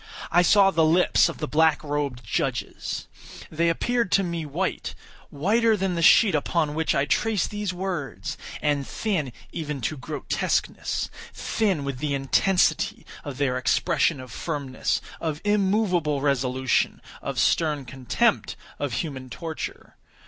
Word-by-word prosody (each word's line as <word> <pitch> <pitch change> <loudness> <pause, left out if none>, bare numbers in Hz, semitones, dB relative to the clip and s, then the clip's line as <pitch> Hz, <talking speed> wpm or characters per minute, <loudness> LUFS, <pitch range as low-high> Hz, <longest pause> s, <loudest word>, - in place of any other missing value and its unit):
I 175 - +5
saw 195 +2 +5
the 165 -3 +3
lips 170 +2 +4
of 170 - -6
the 150 - -3
black 160 +1 +3
robed 145 -4 -2
judges. 105 - -3 0.4
They 170 +2 +2
appeared 235 +4 0
to 195 - +4
me 170 -3 -3
white—whiter 190 +5 -1
than 190 -1 0
the 170 - -1
sheet 195 +5 +6
upon 150 0 0
which 160 +1 0
I 140 - +2
trace 215 +4 +1
these 210 -2 -3
words—and 150 - -3
thin 175 - -2 0.2
even 150 -3 -4
to 150 +6 -2
grotesqueness; 145 +2 -2 0.2
thin 195 -10 0
with 140 -2 -4
the 145 -1 -1
intensity 175 +7 +2 0.2
of 140 -3 -6
their 130 -3 0
expression 155 +2 +2
of 130 -2 -9
firmness—of 150 +2 -3
immoveable 195 -7 +2
resolution—of 130 -2 -1
stern 150 -4 +2
contempt 130 -1 0 0.2
of 145 -4 -2
human 130 -3 -4
torture. 160 +6 -6
155 Hz, 125 wpm, -25 LUFS, 140-185 Hz, 0.4 s, sheet